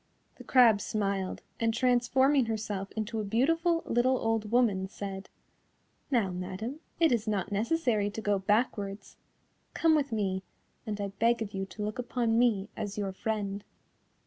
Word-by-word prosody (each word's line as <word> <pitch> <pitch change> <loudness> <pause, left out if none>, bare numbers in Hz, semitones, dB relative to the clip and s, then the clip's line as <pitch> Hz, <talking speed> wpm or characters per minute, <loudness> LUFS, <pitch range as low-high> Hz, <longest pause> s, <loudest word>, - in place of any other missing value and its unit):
The - - -11
crab 235 -6 +5
smiled, 195 -3 -2 0.2
and 230 0 +2
transforming 255 +2 +3
herself 210 -3 -3
into 220 +1 -3
a - - -1
beautiful 330 - +1
little 255 +2 +2
old 225 -2 -1
woman, 215 -5 +2
said: 195 0 -7 0.8
"Now, 230 -9 +2
madam, 190 +10 -5 0.2
it 330 -3 +4
is 230 -2 0
not 205 -2 -1
necessary 220 -1 +1
to 205 - -6
go 205 -2 +1
backwards. 205 0 -1 0.6
Come 325 -1 +4
with 285 -4 +1
me, 195 -4 -1 0.5
and 210 -1 -3
I 200 -1 -2
beg 230 +4 +1
of 205 - -9
you 195 0 -3
to 210 - -7
look 215 +3 -4
upon 235 -2 0
me 215 -5 +2
as 205 -1 -5
your 200 -2 -2
friend." 205 -1 -3
220 Hz, 155 wpm, -30 LUFS, 200-240 Hz, 0.8 s, crab